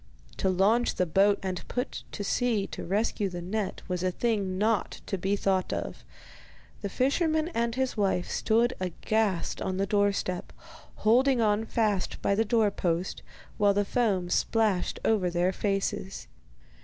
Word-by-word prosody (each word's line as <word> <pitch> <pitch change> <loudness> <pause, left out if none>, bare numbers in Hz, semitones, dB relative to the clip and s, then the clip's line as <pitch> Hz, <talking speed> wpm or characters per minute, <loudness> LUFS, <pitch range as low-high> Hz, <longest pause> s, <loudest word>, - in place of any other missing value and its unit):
To 190 - +1
launch 205 +6 +2
the 180 - +1
boat 195 +4 +3
and 185 -2 -3
put 250 - -3
to 205 - -4
sea 225 -1 +1
to - - -7
rescue 205 +1 0
the 175 -1 -6
net 195 +3 -3
was 180 -2 -2
a 185 - +1
thing 200 -2 -1
not 215 -1 0
to 195 - -2
be 195 +2 0
thought 190 -2 0
of. - - -4 0.8
The 200 - -3
fisherman 315 - +1
and 235 -7 -1
his 260 0 -1
wife 195 -4 0
stood 235 +3 +2
aghast 185 +1 -1
on 185 0 -2
the 195 - +1
doorstep, 200 -3 0 0.5
holding 255 +4 +4
on 215 0 +2
fast 210 -5 0
by - - +1
the 220 +3 +2
doorpost, 200 -6 0 0.4
while 205 -1 +4
the 205 0 +2
foam 195 -7 0
splashed 215 -5 +1
over 200 -5 +2
their 175 +2 +1
faces. 195 -1 -2
200 Hz, 155 wpm, -28 LUFS, 185-225 Hz, 0.8 s, holding